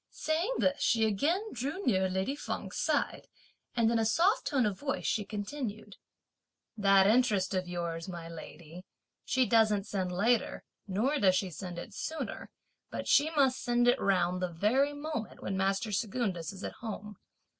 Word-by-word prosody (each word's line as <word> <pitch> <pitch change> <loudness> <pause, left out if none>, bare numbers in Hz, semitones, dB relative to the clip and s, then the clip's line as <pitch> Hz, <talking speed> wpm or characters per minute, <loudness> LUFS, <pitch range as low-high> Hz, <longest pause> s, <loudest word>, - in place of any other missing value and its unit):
Saying 335 +10 -1
this 280 +1 +1
she 225 -2 +3
again 325 - 0
drew 285 - -4
near 190 -5 +2
lady 190 +9 -1
Feng's - - -5
side, - - 0 0.5
and 230 -1 +3
in 230 - +2
a - - +2
soft 360 - +2
tone 265 -6 +2
of 200 -3 -2
voice, 280 -1 -2
she 215 - +1
continued: 210 0 -5 0.8
"That 195 -2 +5
interest 210 -4 +3
of 185 -1 -1
yours, 170 0 -4
my 170 -2 -7
lady, 165 +1 -10 0.4
she 260 -1 +2
doesn't 215 -4 +3
send 190 -3 -2
later, 225 +6 +1 0.2
nor 240 +10 0
does 190 -5 +4
she 185 0 -1
send 175 +1 -7
it 195 +5 -7
sooner; 320 +9 -5 0.4
but - - -5
she 295 +2 +5
must 265 -3 +3
send 240 -1 +2
it 245 +2 +4
round 180 -2 +1
the 180 - 0
very 250 - +2
moment 290 -5 -5
when 195 - -2
master 195 +3 0
Secundus 195 -5 -1
is 195 0 -10
at - - -4
home! 210 -3 -6
210 Hz, 165 wpm, -31 LUFS, 190-255 Hz, 0.8 s, That